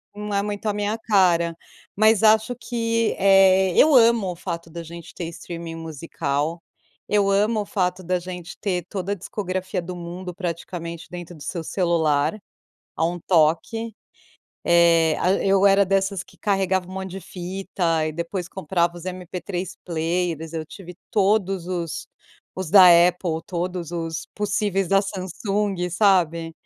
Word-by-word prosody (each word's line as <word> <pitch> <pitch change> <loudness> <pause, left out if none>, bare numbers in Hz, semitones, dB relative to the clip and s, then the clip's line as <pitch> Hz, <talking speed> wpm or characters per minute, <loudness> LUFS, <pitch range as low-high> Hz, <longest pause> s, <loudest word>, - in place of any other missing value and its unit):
Não 210 0 -5
é 200 - +2
muito 205 +1 -5
a 210 - +1
minha 205 +1 -1
cara, 180 -6 +2 0.4
mas 215 +1 +4
acho 220 +3 +4
que, 230 -1 -1
eh, 190 -1 +5
eu 310 +1 +6
amo 230 -5 +5
o - - -7
fato 170 0 -6
da 170 +1 -7
gente 170 0 -10
ter 175 - -5
streaming 170 -1 -7
musical, 160 0 -3 0.5
eu 205 -1 +2
amo 210 +2 +2
o - - -5
fato 185 -2 -1
da 180 +1 0
gente 180 -1 -8
ter 180 -5 -2
toda 195 0 -3
a - - -3
discografia 185 -1 -4
do 180 +1 -7
mundo 175 +1 -7
praticamente 170 -2 -5
dentro 175 0 -8
do 150 - -11
seu 170 +3 -4
celular, 160 -1 +1 0.6
a 160 - +1
um 175 +2 -1
toque. 180 +8 +1 0.7
Eh, 170 -2 +4
a 185 - +2
eu 195 0 +4
era 200 0 +5
dessas 195 -1 0
que - - -21
carregava 190 -3 0
um - - -9
monte 190 -1 -5
de 195 - -6
fita, 175 -3 -2
e 155 - -3
depois 170 +2 -4
comprava 175 -1 -1
os 175 - -10
MP3 180 0 -5
players, 165 -1 -2
eu 160 -1 -3
tive 180 +1 -11 0.2
todos 195 -3 +1
os 175 -3 -4 0.5
os 185 -4 -5
da 195 - +9 0.3
Apple, 175 -2 -3
todos 175 -1 -4
os 165 -1 -4
possíveis 205 -2 0
da 195 0 +4
Samsung, 195 -1 -2
sabe? 170 -4 +2
180 Hz, 155 wpm, -23 LUFS, 170-195 Hz, 0.7 s, da